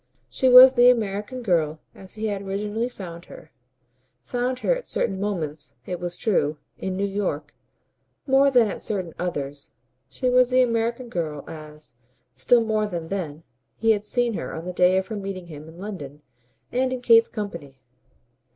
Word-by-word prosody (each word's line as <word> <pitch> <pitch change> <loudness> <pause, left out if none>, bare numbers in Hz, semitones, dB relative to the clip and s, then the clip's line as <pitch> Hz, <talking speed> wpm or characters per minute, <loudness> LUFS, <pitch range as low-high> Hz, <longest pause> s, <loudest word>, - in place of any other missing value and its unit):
She 260 - +2
was 255 +1 +10
the 245 -1 +6
American 220 +1 -1
girl 160 -6 +1
as 190 -1 -12
he 220 0 -4
had 205 -2 -2
originally 210 +4 -2
found 175 -7 -9
her 155 - -13 0.7
found 250 +1 -2
her - - +2
at - - -8
certain 195 -3 -1
moments, 160 -7 -3
it 180 -1 -4
was 175 0 -4
true, 155 -9 +1 0.2
in 185 0 -3
New 200 - 0
York, 185 -7 -3 0.7
more 275 0 +5
than 245 -4 +4
at 200 - -5
certain 185 -6 -3
others; 145 -5 -4 0.4
she 255 - -3
was 250 0 +4
the 255 0 +4
American 235 +1 -1
girl 155 -8 -4
as, 150 -5 -9 0.4
still 230 - +3
more 215 -1 0
than 170 -4 -5
then, 165 -6 -4 0.3
he 225 0 +2
had 210 -2 +1
seen 240 +1 0
her - - -5
on 160 +1 -6
the 180 - -4
day 180 +1 +4
of 190 - 0
her 215 - -6
meeting 195 -3 -5
him 155 -2 -10
in 165 - -14
London 150 -8 -8 0.5
and 255 +1 0
in 255 -1 -3
Kate's 230 -1 +5
company. 170 - -7
195 Hz, 175 wpm, -24 LUFS, 165-235 Hz, 0.7 s, was